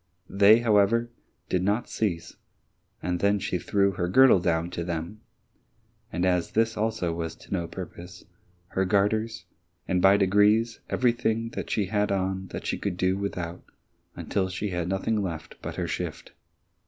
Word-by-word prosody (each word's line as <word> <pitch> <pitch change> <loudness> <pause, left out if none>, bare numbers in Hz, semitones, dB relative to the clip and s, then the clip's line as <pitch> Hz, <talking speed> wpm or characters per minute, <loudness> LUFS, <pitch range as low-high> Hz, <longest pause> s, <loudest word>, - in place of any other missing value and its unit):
They, 100 +4 +6
however, 115 +1 +3 0.4
did 90 - 0
not 105 +6 0
cease, 90 -7 -3 0.7
and 90 -1 -1
then 100 +1 +3
she 90 -2 -2
threw 100 +1 +1
her 90 -1 -2
girdle 130 0 +6
down 85 -1 0
to 85 - -3
them, 85 +4 -5 0.9
and 90 - -1
as 90 -2 0
this 115 0 +2
also 110 -6 -1
was 80 -1 -4
to - - -10
no 85 -3 -1
purpose, 90 -1 -9 0.4
her 95 - 0
garters, 100 -1 0 0.4
and 90 -1 +1
by 95 +2 +6
degrees 105 +4 +3
everything 115 -2 +1
that - - -6
she 105 - 0
had 105 +2 0
on 95 0 -1
that - - -7
she - - -2
could 95 -3 -3
do 95 +1 +1
without 90 -3 -4 0.5
until 95 -2 -2
she 100 +2 -3
had 85 -1 -2
nothing 105 +3 0
left 85 -5 -5
but - - -6
her - - -2
shift. - - -5
95 Hz, 160 wpm, -26 LUFS, 90-105 Hz, 0.9 s, They